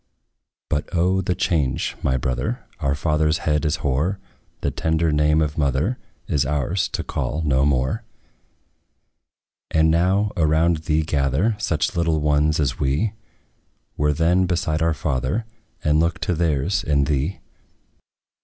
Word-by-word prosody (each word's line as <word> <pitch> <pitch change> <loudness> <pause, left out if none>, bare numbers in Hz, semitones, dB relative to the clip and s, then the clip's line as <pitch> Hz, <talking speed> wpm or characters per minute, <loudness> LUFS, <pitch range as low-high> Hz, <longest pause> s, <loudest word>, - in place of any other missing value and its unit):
But 75 - -2
O! 90 +3 +2
the 90 -1 -1
change, 80 -7 0
my 65 -1 +1
brother! 65 0 -2
Our 70 0 0
father's 75 +1 +1
head 75 0 +1
is 75 +1 +1
hoar; 75 +9 +1 0.4
The - - 0
tender 80 0 0
name 75 +1 +3
of 75 +2 -3
mother 75 - 0 0.3
Is 70 - +1
ours 75 +6 0
to - - -2
call 70 +6 -3
no 70 -1 +3
more. 65 -2 0 1.7
And 80 0 +3
now, 95 +5 +2
around 80 0 +2
thee 80 0 0
gather 75 - +1
Such 85 -8 -1
little 85 -2 +1
ones 75 +1 +2
as 70 -4 0
we 70 +11 0 0.8
Were 75 0 +1
then, 85 +5 +2
beside 85 -3 -1
our 80 -1 +2
father, 70 - -1 0.4
And 75 0 +3
look 85 +1 +1
to 90 - 0
theirs 85 +2 0
in 70 -2 +2
thee. 75 +5 -1
75 Hz, 140 wpm, -22 LUFS, 70-85 Hz, 1.7 s, name